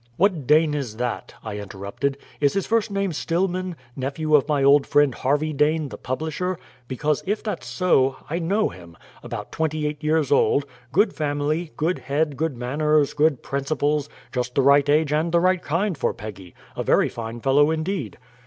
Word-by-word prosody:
"What 175 Hz, -8 st, +1 dB
Dane 155 Hz, 0 st, +4 dB
is 130 Hz, -7 st, -4 dB
that?" 120 Hz, 0 st, -3 dB
I 105 Hz, -2 st, -5 dB
interrupted. 100 Hz, +8 st, -4 dB, 0.2 s
"Is 145 Hz, -1 st, +2 dB
his 195 Hz, -, -1 dB
first 225 Hz, -1 st, +1 dB
name 195 Hz, -3 st, -1 dB
Stillman 180 Hz, +3 st, -1 dB, 0.2 s
nephew 145 Hz, +4 st, -2 dB
of 145 Hz, -1 st, +3 dB
my 145 Hz, -3 st, +1 dB
old 140 Hz, +1 st, +5 dB
friend 145 Hz, -3 st, +4 dB
Harvey 145 Hz, +5 st, 0 dB
Dane, 150 Hz, +1 st, +1 dB
the 105 Hz, -, -8 dB
publisher? 160 Hz, +7 st, -3 dB, 0.3 s
Because, 145 Hz, +3 st, -1 dB
if 210 Hz, +2 st, -1 dB
that's 210 Hz, -, -4 dB
so, 135 Hz, 0 st, +2 dB
I 165 Hz, +3 st, -2 dB
know 195 Hz, +6 st, +1 dB
him; 85 Hz, -3 st, -13 dB, 0.2 s
about -, -, -7 dB
twenty 155 Hz, -1 st, -1 dB
eight 150 Hz, +1 st, -4 dB
years 155 Hz, -2 st, +1 dB
old; 140 Hz, 0 st, +3 dB, 0.3 s
good 205 Hz, +9 st, +3 dB
family, 150 Hz, +2 st, -1 dB
good 170 Hz, +4 st, 0 dB
head, 145 Hz, +2 st, -1 dB
good 155 Hz, -2 st, -2 dB
manners, 145 Hz, +4 st, +1 dB
good 150 Hz, -3 st, +2 dB
principles; 145 Hz, +1 st, -1 dB, 0.2 s
just 125 Hz, -1 st, -3 dB
the 135 Hz, -, +3 dB
right 140 Hz, +1 st, +5 dB
age 150 Hz, 0 st, +3 dB
and 160 Hz, +2 st, +1 dB
the 170 Hz, -, +4 dB
right 185 Hz, 0 st, +2 dB
kind 180 Hz, +5 st, -1 dB
for 140 Hz, -, -1 dB
Peggy 100 Hz, -5 st, -9 dB, 0.2 s
a -, -, -3 dB
very -, -, +3 dB
fine 115 Hz, 0 st, -6 dB
fellow 140 Hz, +4 st, +4 dB
indeed." 160 Hz, -, -2 dB
150 Hz, 180 wpm, -23 LUFS, 135-160 Hz, 0.3 s, old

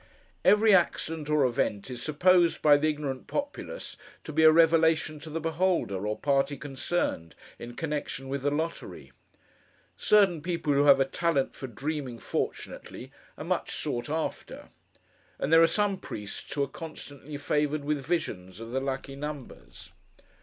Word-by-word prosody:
Every 210 Hz, 0 st, +6 dB
accident 165 Hz, -4 st, +1 dB
or 150 Hz, -3 st, +3 dB
event, 120 Hz, -3 st, -1 dB
is 125 Hz, -1 st, -6 dB
supposed, 170 Hz, +3 st, +3 dB
by 150 Hz, -1 st, +7 dB
the 150 Hz, +2 st, +2 dB
ignorant 145 Hz, -3 st, -4 dB
populace, 290 Hz, +12 st, -5 dB, 0.3 s
to 155 Hz, -, -7 dB
be 160 Hz, -, +2 dB
a 155 Hz, -, +9 dB
revelation 160 Hz, -1 st, +3 dB
to 160 Hz, -, -9 dB
the 160 Hz, +2 st, -3 dB
beholder, 160 Hz, -, 0 dB
or 105 Hz, -, -2 dB
party 140 Hz, 0 st, +1 dB
concerned, 135 Hz, -, -2 dB, 0.2 s
in 120 Hz, 0 st, -8 dB
connection 150 Hz, -4 st, -4 dB
with 135 Hz, 0 st, -3 dB
the 145 Hz, -, +1 dB
lottery. 160 Hz, +3 st, -4 dB, 0.8 s
Certain 195 Hz, -6 st, +4 dB
people 165 Hz, -3 st, -1 dB
who 140 Hz, +1 st, +3 dB
have 140 Hz, -1 st, +7 dB
a 135 Hz, -, +4 dB
talent 140 Hz, 0 st, 0 dB
for 135 Hz, -, -7 dB
dreaming 135 Hz, +1 st, -4 dB
fortunately, -, -, -5 dB, 0.3 s
are -, -, -7 dB
much -, -, -1 dB
sought 120 Hz, +4 st, -3 dB
after; 160 Hz, +1 st, -4 dB, 0.7 s
and 150 Hz, -, -1 dB
there 165 Hz, -, +8 dB
are 165 Hz, -, +7 dB
some 205 Hz, 0 st, +1 dB
priests 105 Hz, -, -7 dB
who 140 Hz, -, 0 dB
are -, -, -1 dB
constantly 145 Hz, -1 st, -9 dB
favoured 150 Hz, +1 st, 0 dB
with 145 Hz, -2 st, -1 dB
visions 105 Hz, -, -3 dB
of 115 Hz, 0 st, -8 dB
the 130 Hz, +1 st, -1 dB
lucky 135 Hz, 0 st, -4 dB
numbers. 145 Hz, -2 st, -8 dB
150 Hz, 155 wpm, -28 LUFS, 135-165 Hz, 0.8 s, a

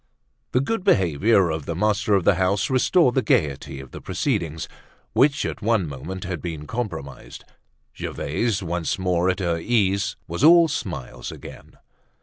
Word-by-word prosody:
The 125 Hz, -, +3 dB
good 190 Hz, +7 st, -2 dB
behavior 95 Hz, -, +3 dB
of 80 Hz, -2 st, -4 dB
the 85 Hz, -, -2 dB
master 105 Hz, +2 st, +1 dB
of 95 Hz, -, +2 dB
the 95 Hz, -, +5 dB
house 95 Hz, +5 st, 0 dB
restored 130 Hz, +2 st, +3 dB
the 130 Hz, -, +2 dB
gaiety 70 Hz, -, 0 dB
of 65 Hz, -1 st, -11 dB
the -, -, -9 dB
proceedings, 80 Hz, -1 st, -2 dB, 0.5 s
which 140 Hz, +1 st, +3 dB
at -, -, -4 dB
one 110 Hz, -5 st, +1 dB
moment 85 Hz, +7 st, -7 dB
had 90 Hz, -1 st, -4 dB
been 80 Hz, -4 st, -5 dB
compromised. 85 Hz, -, -6 dB, 0.5 s
Gervaise, 115 Hz, -5 st, -2 dB
once 85 Hz, -1 st, -2 dB
more 90 Hz, -1 st, +1 dB
at 90 Hz, -, 0 dB
her 85 Hz, -2 st, 0 dB
ease, 100 Hz, -1 st, +1 dB
was 85 Hz, +9 st, -4 dB
all 170 Hz, +1 st, +8 dB
smiles 85 Hz, -, -5 dB
again. -, -, -12 dB
95 Hz, 155 wpm, -23 LUFS, 85-115 Hz, 0.5 s, all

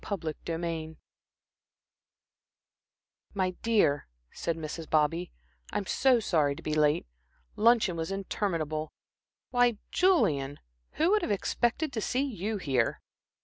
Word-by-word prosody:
Chapter 165 Hz, -6 st, -2 dB
XVIII 165 Hz, -1 st, -3 dB, 2.4 s
"My 185 Hz, -2 st, +1 dB
dear," 205 Hz, -11 st, +2 dB, 0.2 s
said 165 Hz, -1 st, -3 dB
Mrs. 160 Hz, 0 st, -6 dB
Bobby, 165 Hz, +3 st, +1 dB, 0.4 s
"I'm 205 Hz, -1 st, -2 dB
so 255 Hz, +4 st, +3 dB
sorry 155 Hz, -9 st, +1 dB
to -, -, -11 dB
be 155 Hz, -, -2 dB
late. 150 Hz, -1 st, +3 dB, 0.5 s
Luncheon 220 Hz, -5 st, +4 dB
was 165 Hz, +1 st, -3 dB
interminable. 165 Hz, -6 st, -2 dB, 0.6 s
Why, 245 Hz, -3 st, +3 dB
Julian, 145 Hz, -, +2 dB, 0.3 s
who 325 Hz, +4 st, +2 dB
would 425 Hz, 0 st, +4 dB
have -, -, -2 dB
expected 240 Hz, +8 st, 0 dB
to 220 Hz, -, -2 dB
see 255 Hz, +5 st, 0 dB
you 220 Hz, -5 st, -3 dB
here?" 130 Hz, -, 0 dB
175 Hz, 115 wpm, -29 LUFS, 155-225 Hz, 2.4 s, Luncheon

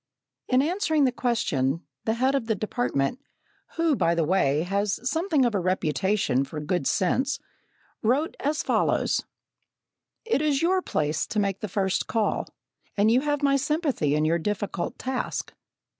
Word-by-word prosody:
In 255 Hz, +1 st, +3 dB
answering 320 Hz, -2 st, +1 dB
the 255 Hz, -, +2 dB
question, 165 Hz, -, 0 dB, 0.2 s
the 220 Hz, -, +1 dB
head 260 Hz, +3 st, +2 dB
of 270 Hz, -5 st, -1 dB
the 220 Hz, -, +1 dB
department, 215 Hz, -, -1 dB, 0.6 s
who, 330 Hz, -3 st, +2 dB
by 170 Hz, -7 st, +2 dB
the 165 Hz, -, +2 dB
way, 155 Hz, -3 st, +2 dB
has 200 Hz, +2 st, -1 dB
something 315 Hz, -1 st, +2 dB
of 235 Hz, -, +1 dB
a 200 Hz, -, +1 dB
reputation 185 Hz, -4 st, +1 dB
for 150 Hz, +3 st, -6 dB
good 150 Hz, -1 st, -1 dB
sense, 260 Hz, -, +1 dB, 0.6 s
wrote 265 Hz, +8 st, +1 dB
as 295 Hz, +2 st, -1 dB
follows: -, -, +1 dB, 1.0 s
"It 450 Hz, -10 st, +1 dB
is 295 Hz, -1 st, +1 dB
your 370 Hz, +2 st, +3 dB
place 155 Hz, -, -1 dB
to 215 Hz, -, -1 dB
make 195 Hz, -2 st, 0 dB
the 215 Hz, -, -4 dB
first 190 Hz, 0 st, -1 dB
call, 220 Hz, -2 st, 0 dB, 0.5 s
and 210 Hz, +2 st, +4 dB
you 250 Hz, +3 st, +4 dB
have 290 Hz, 0 st, -1 dB
my 275 Hz, -1 st, +4 dB
sympathy 285 Hz, -, 0 dB
in 150 Hz, 0 st, +1 dB
your 165 Hz, +2 st, +2 dB
difficult 205 Hz, -1 st, -3 dB
task. 255 Hz, -1 st, -3 dB
220 Hz, 160 wpm, -26 LUFS, 175-275 Hz, 1.0 s, and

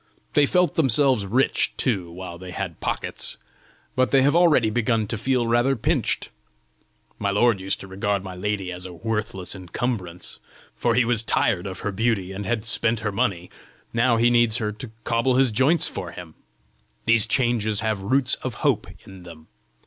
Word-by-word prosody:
They 145 Hz, -1 st, +4 dB
felt 180 Hz, +2 st, +2 dB
themselves 135 Hz, -7 st, +2 dB
rich 125 Hz, +7 st, +2 dB
too 95 Hz, -10 st, -1 dB
while 85 Hz, -1 st, -8 dB
they 95 Hz, 0 st, -9 dB
had 90 Hz, -2 st, -5 dB
pockets, -, -, -3 dB, 0.6 s
but 130 Hz, 0 st, +2 dB
they 135 Hz, -1 st, +4 dB
have 145 Hz, +3 st, +3 dB
already 155 Hz, -11 st, +4 dB
begun 115 Hz, -1 st, +1 dB
to 110 Hz, -, -3 dB
feel 125 Hz, +2 st, 0 dB
rather 120 Hz, +4 st, +2 dB
pinched! 115 Hz, -, 0 dB, 0.9 s
My 100 Hz, -, 0 dB
lord 105 Hz, +1 st, +3 dB
used 95 Hz, +1 st, -2 dB
to 95 Hz, -, -9 dB
regard 100 Hz, +1 st, -1 dB
my 95 Hz, -1 st, -7 dB
lady 95 Hz, 0 st, -2 dB
as 90 Hz, +1 st, -6 dB
a 90 Hz, -, -10 dB
worthless 105 Hz, -1 st, -3 dB
encumbrance, 90 Hz, -1 st, -4 dB, 0.4 s
for 120 Hz, -1 st, +1 dB
he 125 Hz, -1 st, +4 dB
was 115 Hz, -2 st, +2 dB
tired 100 Hz, -4 st, +1 dB
of 95 Hz, -, -6 dB
her 105 Hz, -, -2 dB
beauty 100 Hz, -2 st, 0 dB
and 100 Hz, 0 st, -5 dB
had 110 Hz, +1 st, -1 dB
spent 115 Hz, 0 st, 0 dB
her 105 Hz, -1 st, -1 dB
money; 100 Hz, -5 st, -1 dB, 0.4 s
now 115 Hz, 0 st, +3 dB
he 120 Hz, +1 st, +4 dB
needs 120 Hz, -1 st, +3 dB
her 105 Hz, -3 st, -2 dB
to 110 Hz, +3 st, -8 dB
cobble 115 Hz, +2 st, +1 dB
his 130 Hz, -2 st, +3 dB
joints 135 Hz, +10 st, +3 dB
for 90 Hz, -3 st, -6 dB
him! 85 Hz, -3 st, -10 dB, 0.7 s
These 115 Hz, -2 st, +4 dB
changes 115 Hz, -5 st, +1 dB
have 110 Hz, -3 st, -1 dB
roots 130 Hz, +6 st, +2 dB
of 130 Hz, -4 st, -4 dB
hope -, -, +2 dB, 0.2 s
in 95 Hz, -1 st, -12 dB
them. 80 Hz, -3 st, -13 dB
110 Hz, 180 wpm, -24 LUFS, 95-120 Hz, 0.9 s, They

